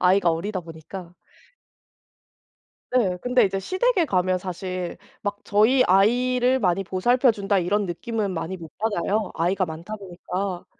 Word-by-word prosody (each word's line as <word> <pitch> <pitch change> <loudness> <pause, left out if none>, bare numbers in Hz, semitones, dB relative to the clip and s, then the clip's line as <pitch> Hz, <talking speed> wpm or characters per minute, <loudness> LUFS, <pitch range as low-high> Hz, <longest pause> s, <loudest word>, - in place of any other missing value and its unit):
아이가 180 -1 +4
어리다 185 +4 -2
보니까. 170 +2 -10 1.8
네. 200 -8 +2
근데 250 -1 +3
이제 195 -1 0
시댁에 370 - +1
가면 185 -5 +1
사실 180 -1 -5 0.2
막 205 0 -3
'저희 225 +6 +4
아이를 250 +6 +3
많이 195 -3 +1
보살펴 240 +7 +3
준다.' 200 -1 0
이런 200 +4 +1
느낌은 205 +3 -3
많이 180 +2 -3
못 165 -3 -10
받아요, 210 -1 0
아이가 185 +3 +1
많다 170 +6 -7
보니까. 185 -1 -5
195 Hz, 295 characters per minute, -24 LUFS, 180-220 Hz, 1.8 s, 아이가